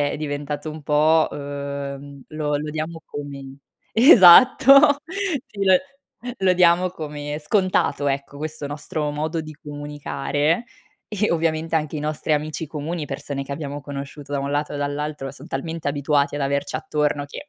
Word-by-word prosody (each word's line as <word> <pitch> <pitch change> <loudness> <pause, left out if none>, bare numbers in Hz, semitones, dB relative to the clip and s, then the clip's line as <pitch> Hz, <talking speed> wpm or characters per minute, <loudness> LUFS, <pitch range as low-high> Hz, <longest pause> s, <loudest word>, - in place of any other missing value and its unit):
è 145 - +1
è - - -4
diventato 145 0 -4
un 155 0 -9
po', 155 +2 +3
uhm 140 -1 -6
lo 150 -1 -2
lo 150 +1 -4
diamo 160 +2 -5
come 140 -2 -8 0.3
esatto! 265 - +8 0.5
Sì, 200 -1 -4
lo 190 -1 +6 0.6
lo 190 -1 +3
diamo 180 0 +4
come 150 -3 -6
scontato, 185 -3 +1
ecco, 140 +1 -4
questo 155 -1 -5
nostro 150 +1 -4
modo 155 +3 -2
di 155 -1 -8
comunicare. 145 +4 -2 0.5
E, 210 0 0
ovviamente, 165 -1 0
anche 155 0 -2
i - - -3
nostri 150 +1 -2
amici 155 +1 -2
comuni, 150 +1 -4
persone 140 0 -5
che 140 - -6
abbiamo 145 0 -5
conosciuto 140 0 -8
da 140 - 0
un 140 0 -3
lato 145 +1 -2
e - - -3
dall'altro, 145 -1 -3
son 140 - -13
talmente 160 +3 -4
abituati 145 0 +1
ad 145 - -3
averci 140 +1 -1
attorno 150 -1 -1
che 145 - -9
150 Hz, 160 wpm, -22 LUFS, 145-160 Hz, 0.6 s, esatto